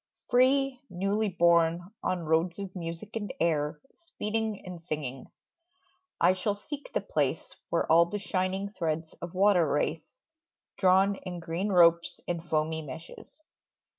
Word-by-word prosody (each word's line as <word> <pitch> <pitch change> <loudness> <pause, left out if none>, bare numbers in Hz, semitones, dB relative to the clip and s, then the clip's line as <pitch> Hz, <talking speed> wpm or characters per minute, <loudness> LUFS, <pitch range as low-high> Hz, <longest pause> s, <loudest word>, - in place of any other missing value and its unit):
Free, 260 +1 +3
newly 195 +4 0
born, 170 0 +3
on 180 -2 -1
roads 165 +2 +1
of 195 -2 -7
music 170 +5 -6
and 205 -4 -3
air 150 -3 +1
Speeding 220 - -4
and 180 -2 -8
singing, 145 -6 -5 0.9
I 185 - +5
shall 195 +2 -1
seek 285 +8 -8
the - - +1
place - - -2
Where - - +1
all 170 +1 +5
the 205 - -3
shining 190 0 -2
threads 160 -4 -3
of 175 +1 -7
water 190 -4 +4
race, 150 +2 -2 0.6
Drawn 190 +1 +4
in 180 -1 -7
green 170 +5 -2
ropes 170 -2 +4
and 170 -1 -2
foamy 160 -1 -1
meshes. 160 - -11
180 Hz, 135 wpm, -29 LUFS, 165-200 Hz, 0.9 s, I